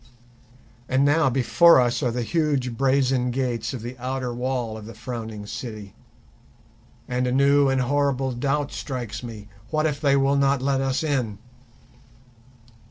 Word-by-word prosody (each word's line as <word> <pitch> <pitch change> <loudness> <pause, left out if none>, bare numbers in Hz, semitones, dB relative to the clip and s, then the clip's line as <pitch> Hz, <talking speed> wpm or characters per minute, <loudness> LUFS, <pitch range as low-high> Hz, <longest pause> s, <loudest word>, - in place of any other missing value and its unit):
And 130 +2 +3
now 145 0 +3
before 135 +6 +5
us 120 +1 +1
are 125 - +1
the 120 +1 -2
huge 140 -4 0
brazen 130 -1 +2
gates 120 -3 -2
of 125 -4 -6
the 120 +2 -6
outer 130 0 -3
wall 125 -2 -2
of 110 -1 -9
the 115 - -10
Frowning 110 -3 -6
City, 105 -2 -7 1.1
and 125 0 -1
a - - 0
new 140 +1 +4
and 135 -1 +1
horrible 135 0 0
doubt 140 +3 -1
strikes 120 -4 -5
me: 110 -4 -9 0.2
What 155 +2 0
if 150 -2 -1
they 140 -2 +3
will 135 +1 +2
not 140 0 +2
let 135 +1 0
us 135 +2 -1
in? 130 -9 -1
130 Hz, 155 wpm, -24 LUFS, 120-140 Hz, 1.1 s, before